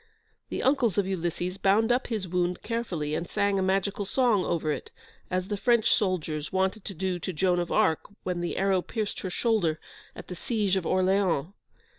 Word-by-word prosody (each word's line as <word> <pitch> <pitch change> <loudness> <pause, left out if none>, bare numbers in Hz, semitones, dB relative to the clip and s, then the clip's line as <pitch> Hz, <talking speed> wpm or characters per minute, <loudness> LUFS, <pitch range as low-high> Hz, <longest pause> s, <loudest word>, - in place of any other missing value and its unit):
The - - -3
uncles 255 -7 +2
of 200 - +3
Ulysses 180 0 -2
bound 215 +4 +3
up 250 +2 +1
his 215 -5 -3
wound 180 0 -1
carefully, 180 -11 -2
and 170 +2 -2
sang 200 -1 +1
a - - +1
magical 195 +2 0
song 220 -2 +2
over 160 -3 0
it, - - -4 0.4
as 185 0 -1
the 205 - -2
French 235 +2 +3
soldiers 165 -7 -1
wanted 190 +2 0
to 195 - -5
do 185 +1 -2
to 185 - -3
Joan 180 +1 +1
of 175 - -2
Arc 160 -1 +2 0.2
when 180 -1 -2
the 175 - -3
arrow 190 -1 +2
pierced 215 +2 -3
her 185 - -4
shoulder 180 -7 +1 0.4
at - - -9
the 180 - -6
siege 205 -1 0
of 185 -3 -1
Orleans. 185 -3 +2
190 Hz, 190 wpm, -27 LUFS, 175-205 Hz, 0.4 s, of